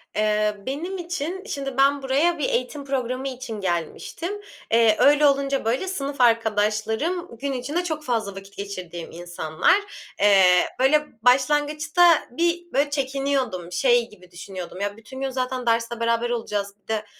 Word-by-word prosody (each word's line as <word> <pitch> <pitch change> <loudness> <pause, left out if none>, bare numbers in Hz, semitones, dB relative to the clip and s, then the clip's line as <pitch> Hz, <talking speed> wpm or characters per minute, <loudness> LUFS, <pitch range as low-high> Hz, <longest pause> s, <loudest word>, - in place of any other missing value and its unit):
Eee, 210 0 +1
benim 330 +9 -4
için 350 +1 -4
Şimdi 275 - -4
ben 280 +1 +4
buraya 290 +6 +2
bir 280 - 0
eğitim 255 +4 -2
programı 260 -1 -2
için 245 -5 -7
gelmiştim. 190 - -3 0.3
Eee, 225 -1 +5
öyle 295 +1 +5
olunca 275 -2 +1
böyle 250 +11 0
sınıf 280 -7 -3
arkadaşlarım 225 - +1
gün 280 +2 -3
içinde 285 +8 -2
çok 315 -3 -3
fazla 225 -7 -2
vakit 195 0 -11
geçirdiğim 185 -4 -6
insanlar. 170 - +1 0.5
Eee, 200 -2 +6 0.3
böyle 300 +3 +3
başlangıçta 295 +6 +4
bir 345 +4 -1
böyle 285 +2 +2
çekiniyordum. 270 - -2
Şey 240 +4 +2
gibi 180 -3 -18
düşünüyordum, 185 +1 -8
"Ya, 205 +1 -2
bütün 260 +4 -10
gün 270 - -1
zaten 255 -1 -3
derste 230 0 0
beraber 230 +1 +1
olacağız, 205 -4 -3
bir - - -48
de 220 -1 -2
255 Hz, 145 wpm, -23 LUFS, 210-285 Hz, 0.5 s, Eee